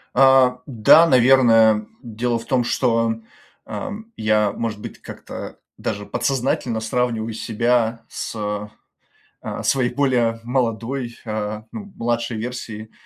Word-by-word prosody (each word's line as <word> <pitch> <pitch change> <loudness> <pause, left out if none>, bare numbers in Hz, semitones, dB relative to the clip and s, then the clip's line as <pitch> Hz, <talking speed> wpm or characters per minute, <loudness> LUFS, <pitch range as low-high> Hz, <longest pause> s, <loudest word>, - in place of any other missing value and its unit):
А, 130 -1 +5
да, 140 +6 +6
наверное. 115 -5 +5 0.2
Дело 120 +1 -2
в 115 - -8
том, 125 0 +1
что, 115 -1 +1 0.5
ам, 220 +2 -6
я, 110 -1 +2
может 110 0 -4
быть, - - -9
как-то - - -9 0.2
даже 105 0 -4
подсознательно 120 -1 -1
сравниваю 115 -1 -1
себя 115 +1 0
с, - - -5
э, 105 -1 -3 0.7
э, - - -5
своей 130 -3 +2
более 120 -5 +1
молодой, 120 0 -2
э, 105 -1 -3
ну, 205 -2 -8
младшей 120 0 -2
версией. 110 -2 -6
115 Hz, 120 wpm, -21 LUFS, 110-125 Hz, 0.7 s, да